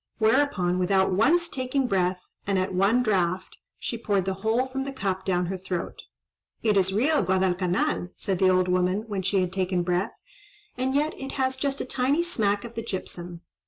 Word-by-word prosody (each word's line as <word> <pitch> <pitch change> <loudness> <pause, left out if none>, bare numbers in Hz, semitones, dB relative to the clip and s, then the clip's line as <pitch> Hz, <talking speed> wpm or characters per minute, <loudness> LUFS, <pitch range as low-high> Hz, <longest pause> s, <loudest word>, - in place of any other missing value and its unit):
Whereupon, 220 -6 +2
without 190 +1 +2
once 325 - +3
taking 260 -2 -1
breath, 180 -4 0 0.2
and 200 -1 +1
at 185 0 -1
one 200 +7 +3
draught, 185 -4 0 0.2
she 235 - -4
poured 200 -4 0
the 190 - 0
whole 225 +4 +2
from 265 +1 -4
the 275 - -4
cup 195 -7 -3
down 180 -2 +1
her 185 +1 -4
throat. 180 -1 -4 0.6
"It 215 -2 +3
is 190 -1 +3
real 275 +10 +2
Guadalcanal," 185 -1 +1
said 190 -4 -2
the 190 - +5
old 185 0 +3
woman, 180 +2 +1
when 200 -3 -2
she 190 +1 +1
had 180 0 -2
taken 185 -2 0
breath; 180 +4 0 0.6
"and 260 +1 -1
yet 300 +2 +1
it 270 0 -6
has 260 -1 0
just 275 +1 -2
a - - -3
tiny 265 +6 +1
smack 205 - 0
of 235 -1 -8
the 230 - -4
gypsum. 180 -5 -6
195 Hz, 190 wpm, -26 LUFS, 185-255 Hz, 0.6 s, the